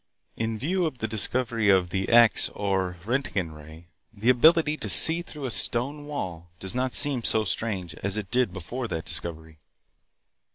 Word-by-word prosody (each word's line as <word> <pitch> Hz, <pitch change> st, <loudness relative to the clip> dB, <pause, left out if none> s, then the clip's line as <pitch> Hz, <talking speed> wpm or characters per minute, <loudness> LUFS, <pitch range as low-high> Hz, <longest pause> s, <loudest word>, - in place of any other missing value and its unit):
In 115 Hz, -1 st, -3 dB
view 175 Hz, -, -1 dB
of 130 Hz, -, -7 dB
the 110 Hz, -, -3 dB
discovery 115 Hz, 0 st, -1 dB
of 95 Hz, -3 st, +3 dB
the 95 Hz, +1 st, -2 dB
X 120 Hz, -1 st, +4 dB
or 95 Hz, -3 st, -2 dB
Roentgen 105 Hz, -, -2 dB
ray, 80 Hz, +2 st, -13 dB, 0.3 s
the 110 Hz, +2 st, -1 dB
ability 155 Hz, +4 st, +4 dB
to -, -, -6 dB
see 165 Hz, +1 st, +5 dB
through 150 Hz, -5 st, -9 dB
a 125 Hz, -, -3 dB
stone 140 Hz, +7 st, 0 dB
wall 90 Hz, -, -6 dB
does 95 Hz, -, -5 dB
not 130 Hz, 0 st, -1 dB
seem 140 Hz, -5 st, +4 dB
so 110 Hz, 0 st, +4 dB
strange 95 Hz, -5 st, -3 dB
as 100 Hz, +6 st, -3 dB
it 100 Hz, -3 st, -6 dB
did 125 Hz, -4 st, +2 dB
before 115 Hz, +8 st, -6 dB
that 80 Hz, -6 st, -5 dB
discovery. 80 Hz, -1 st, -6 dB
110 Hz, 170 wpm, -25 LUFS, 90-130 Hz, 0.3 s, see